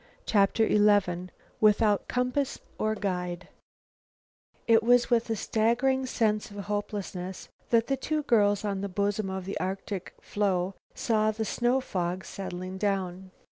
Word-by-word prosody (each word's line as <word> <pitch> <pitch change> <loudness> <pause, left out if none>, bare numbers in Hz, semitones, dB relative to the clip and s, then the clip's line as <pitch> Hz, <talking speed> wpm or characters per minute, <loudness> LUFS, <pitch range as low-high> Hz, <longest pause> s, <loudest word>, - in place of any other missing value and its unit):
CHAPTER 215 +2 +3
XI 205 -4 +3 0.3
"WITHOUT 210 -1 +3
COMPASS 250 +2 0 0.2
OR 215 0 +1
GUIDE" 180 -3 -3 1.2
It 225 -1 +6
was 245 +2 +4
with 235 -1 +2
a 225 - +1
staggering 245 +5 +1
sense 215 -4 0
of 205 - -11
hopelessness 200 -2 -4 0.2
that 230 -1 +4
the 270 - 0
two 305 +3 -1
girls 205 -4 +3
on 200 -2 -2
the 200 - -3
bosom 200 +1 -1
of 190 -1 -4
the 195 - -4
Arctic 190 0 -4
floe 190 -2 -1 0.2
saw 215 -1 +1
the 220 +1 -2
snow 240 +4 +1
fog 180 -4 -3
settle 185 -2 -6
down. 190 -2 -2
205 Hz, 135 wpm, -28 LUFS, 190-225 Hz, 1.2 s, It